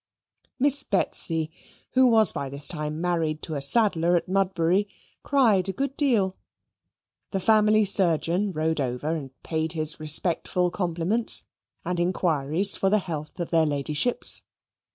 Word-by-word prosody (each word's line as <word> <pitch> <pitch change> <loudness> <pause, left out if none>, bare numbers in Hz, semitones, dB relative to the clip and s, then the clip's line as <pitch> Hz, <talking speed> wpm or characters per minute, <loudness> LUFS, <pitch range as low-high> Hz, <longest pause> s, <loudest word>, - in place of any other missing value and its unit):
Miss 285 +1 +5
Betsy, 165 -5 0 0.4
who 260 0 +4
was 220 -3 +4
by 140 - -5
this 140 +1 -3
time 150 -2 -5
married 165 -3 -2
to 160 - -5
a 140 - -4
saddler 175 0 +3
at 170 - -1
Mudbury, 190 0 0 0.3
cried 220 -10 +1
a - - -3
good 275 +3 -4
deal. 220 -11 +1 0.9
The 195 - -3
family 215 +1 +3
surgeon 185 0 +2
rode 160 -2 -2
over 130 +5 -3
and 140 -4 -7
paid 160 0 -3
his 155 -1 +1
respectful 175 +3 +1
compliments, 180 +5 0 0.4
and 180 -1 -3
inquiries 175 0 +1
for 195 - 0
the 210 - +3
health 160 -5 -7
of 170 - -5
their 165 -2 +2
ladyships. 150 - -1
175 Hz, 140 wpm, -24 LUFS, 155-205 Hz, 0.9 s, Miss